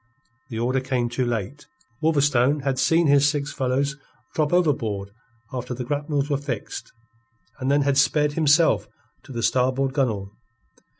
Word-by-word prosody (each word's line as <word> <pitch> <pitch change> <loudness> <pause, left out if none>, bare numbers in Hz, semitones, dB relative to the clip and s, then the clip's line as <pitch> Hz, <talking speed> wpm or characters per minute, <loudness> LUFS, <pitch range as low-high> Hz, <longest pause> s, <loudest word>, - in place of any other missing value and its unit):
The 115 - -5
order 125 +3 +1
came 130 -2 -1
too 120 +1 -1
late. 120 +5 -4 0.3
Wolverstone 145 -3 +2
had 135 -2 -1
seen 165 +6 +3
his 145 0 +5
six 145 -1 -3
fellows 135 +3 -1 0.4
drop 150 -2 0
overboard 115 - 0 0.4
after 125 0 -4
the 125 0 -5
grapnels 145 +1 -1
were 145 -2 0
fixed, 135 -6 -6 0.7
and 130 0 -1
then 145 +1 +3
had 140 0 +2
sped, 150 +2 +2
himself, 160 +1 +3 0.4
to 140 - -12
the 120 -2 -4
starboard 130 +3 +1
gunwale. 110 -9 -1
135 Hz, 145 wpm, -24 LUFS, 125-145 Hz, 0.7 s, his